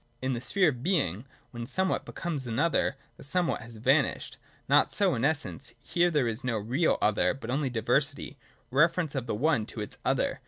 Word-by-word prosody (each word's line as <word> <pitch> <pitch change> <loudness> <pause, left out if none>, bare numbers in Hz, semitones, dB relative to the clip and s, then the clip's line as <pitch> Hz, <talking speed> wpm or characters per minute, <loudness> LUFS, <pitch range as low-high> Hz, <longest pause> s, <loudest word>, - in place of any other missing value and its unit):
In 130 +1 -1
the 120 - -3
sphere 180 - +3
of 125 -5 -5
Being, 135 - 0 0.3
when 120 -1 -6
somewhat 190 +7 0
becomes 150 -7 -4
another, 140 +5 +1 0.2
the - - -12
somewhat 175 +5 +1
has 115 0 -11
vanished. 110 - +1 0.3
Not - - +4
so - - +2
in 115 - -2
Essence: 155 +1 -2
here 175 0 +2
there 145 -7 +1
is 115 +2 -3
no 125 -3 0
real 125 +10 +1
other, 105 +3 +3
but 120 -3 -6
only 135 +1 0
diversity, 135 +5 0 0.3
reference 165 +3 +2
of 130 -4 -3
the 110 - -1
one 120 -3 +1
to 115 - -8
its 105 - -6
other. - - 0
135 Hz, 190 wpm, -28 LUFS, 115-160 Hz, 0.3 s, Not